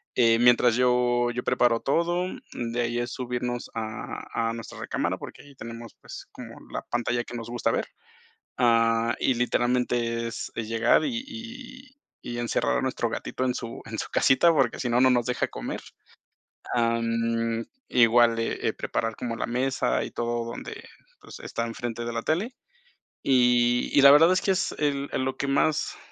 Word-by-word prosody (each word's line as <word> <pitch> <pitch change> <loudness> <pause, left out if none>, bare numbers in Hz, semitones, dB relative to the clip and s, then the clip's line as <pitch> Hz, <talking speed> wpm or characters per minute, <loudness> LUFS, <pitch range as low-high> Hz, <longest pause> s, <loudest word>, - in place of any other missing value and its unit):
eh, 115 -1 +4
mientras 120 -1 +5
yo 125 -1 +2
yo 125 +1 -4
preparo 120 -2 +2
todo, 175 +5 +1
mm, 120 -9 -6
de 120 - 0
ahí 120 0 -1
es 120 - -3
subirnos 125 -1 -3
a 110 -1 -5 0.2
a - - -2
nuestra 115 0 -8
recámara - - -2
porque - - -10
ahí 145 -1 -16
tenemos, 115 -1 -9
pues, - - -10
como - - -10 0.2
la - - -4
pantalla 120 0 0
que 120 - -9
nos 115 0 -7
gusta 120 0 0
ver, - - -1 0.7
ah, 115 -1 +3
y 130 - +2
literalmente 120 -1 0
es 115 - -6
es 115 -2 -4
llegar 115 +1 +3
y 245 -5 -2
y 255 +1 -10 0.3
y 120 0 -4
encerrar 115 - 0
a - - -1
nuestro - - -1
gatito 130 - -3
en 125 - +1
su 115 -2 -6
en - - -6
su - - -3
casita, 135 +6 +4
porque 135 -7 +1
si 125 - -1
no, 120 - +3
no 130 0 +6
nos 120 -2 +2
deja 125 - 0
comer. - - -5 1.0
Ah, 115 -1 +2
mm, 115 0 -1 0.2
igual 120 -1 +5
de, 115 - -1
eh, - - -2
preparar 115 -1 -2
como 120 -2 -4
la - - -1
mesa 125 - 0
y - - -5
todo 120 0 -2
donde, 435 - -7 0.4
pues, - - -11
está 115 - -3
enfrente 115 0 -5
de 120 - -3
la 115 0 -3
tele. 205 +11 -1 0.7
Y 120 -2 +3
y - - +8
la 140 0 +10
verdad 160 +4 +7
es 185 - +1
que 195 - +1
es 190 - 0
el 140 -1 0
el 130 - -1
lo 135 - -3
que 140 - -2
más 140 +2 +1
120 Hz, 185 wpm, -26 LUFS, 115-130 Hz, 1.0 s, la